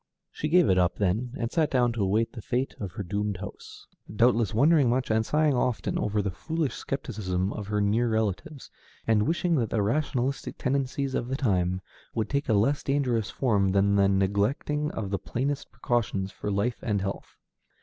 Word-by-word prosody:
She 150 - -3
gave 175 0 +5
it 95 -1 +4
up 90 0 +2
then, 110 +6 -1
and 115 -1 -2
sat 160 -3 +2
down 120 -3 +2
to 115 - -3
await 105 +4 +1
the 115 - -7
fate 125 +5 -1
of 95 -5 -5
her 100 - -4
doomed 100 +2 -2
house, 100 +2 -10 0.3
doubtless 115 -1 +3
wondering 140 +2 +4
much 125 0 0
and 110 0 +3
sighing 150 +4 +2
often 125 -2 0
over 105 0 0
the 100 - -1
foolish 160 - -2
skepticism 100 -8 -3
of 105 -2 -6
her 105 0 0
near 110 +4 +2
relatives, 110 - -2 0.3
and 110 -1 +2
wishing 170 +1 +1
that 115 -5 0
the 105 -3 +1
rationalistic 135 +2 -1
tendencies 135 0 -1
of 120 - -1
the 135 +1 -2
time 95 -7 +1 0.3
would 110 - -1
take 140 -1 -1
a - - +4
less 115 +8 +2
dangerous 125 -6 0
form 100 -7 +1
than 100 +1 +3
the 100 -1 +4
neglecting 100 +10 0
of 100 -8 -5
the 100 - -1
plainest 140 +3 -3
precautions 100 -5 -1
for 105 - -5
life 105 +5 0
and 105 -3 -1
health. 100 0 -5
115 Hz, 190 wpm, -27 LUFS, 100-135 Hz, 0.3 s, gave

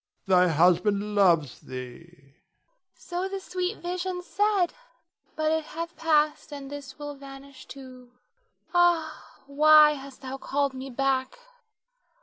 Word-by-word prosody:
Thy 180 -1 +4
husband 190 +6 +2
loves 170 -9 +3
thee. 125 -1 -8
Nina. 140 -5 -25 0.6
So 360 +2 -4
the 390 0 -4
sweet 370 +1 -4
vision 360 +1 -3
said, 400 -1 +1 0.6
but 310 0 0
it 320 0 0
hath 335 +2 -7
passed, 305 -1 +1
and 280 -1 -8
this 280 -2 -9
will 290 -1 -6
vanish 275 -1 -13
too. 255 -2 -12 0.6
Ah, 345 -3 0
why 300 +2 +6
hast 275 -2 -9
thou 265 +1 -5
called 280 0 -1
me 265 +1 -7
back? 270 - -1
280 Hz, 130 wpm, -26 LUFS, 255-330 Hz, 0.6 s, why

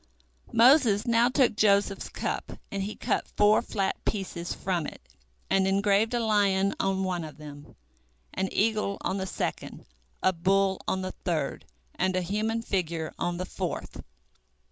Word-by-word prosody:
Moses 235 -4 +5
now 235 0 +4
took 255 -4 +3
Joseph's 200 -2 +2
cup, - - -4 0.2
and 195 - -2
he 205 +2 -4
cut - - -1
four 210 +1 +5
flat 195 -4 -2
pieces 180 -4 -3
from 175 -5 -2
it, - - -9 0.5
and 190 0 +2
engraved 200 +4 +2
a - - +1
lion 200 -3 +2
on 195 0 0
one 180 -3 -2
of 155 -1 -9
them, 145 -1 -11 0.6
an 190 - -1
eagle 210 -2 +1
on 190 - -1
the 190 0 -3
second, - - -4 0.4
a 185 - +4
bull 190 +2 +1
on 190 0 0
the 185 - -3
third, 160 -6 -3 0.3
and 185 0 0
a 185 - +1
human 215 +5 -1
figure 170 -6 -2
on 175 0 -1
the 185 - -3
fourth. - - -5
195 Hz, 155 wpm, -27 LUFS, 185-215 Hz, 0.6 s, Moses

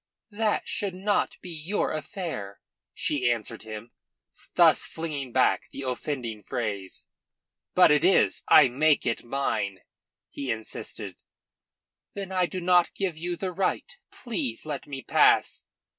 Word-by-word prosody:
"That 215 0 0
should 195 -3 -2
not 200 +2 0
be 180 - -8
your 165 +6 -1
affair," 155 - -5 0.3
she 130 -5 0
answered 115 -1 -2
him, 110 +1 -8 0.6
thus - - +5
flinging 145 -6 -4
back 130 +1 +2
the 140 - -7
offending 125 -4 -3
phrase. 100 -4 -4 0.7
"But 180 -4 +7
it 150 0 +4
is. 185 +2 +4
I 150 -3 +8
make 145 +4 +2
it 115 - -1
mine," 115 -7 -2 0.5
he 140 -2 -5
insisted. 110 -2 -5 1.0
"Then 195 -1 -5
I 185 -2 +2
do 185 - -5
not 180 0 +3
give 190 -4 -1
you 175 +2 -3
the 185 +1 -3
right. 195 - -1
Please 190 - -3
let 145 -3 -5
me 135 -2 -6
pass." - - +3
150 Hz, 135 wpm, -27 LUFS, 120-180 Hz, 1.0 s, I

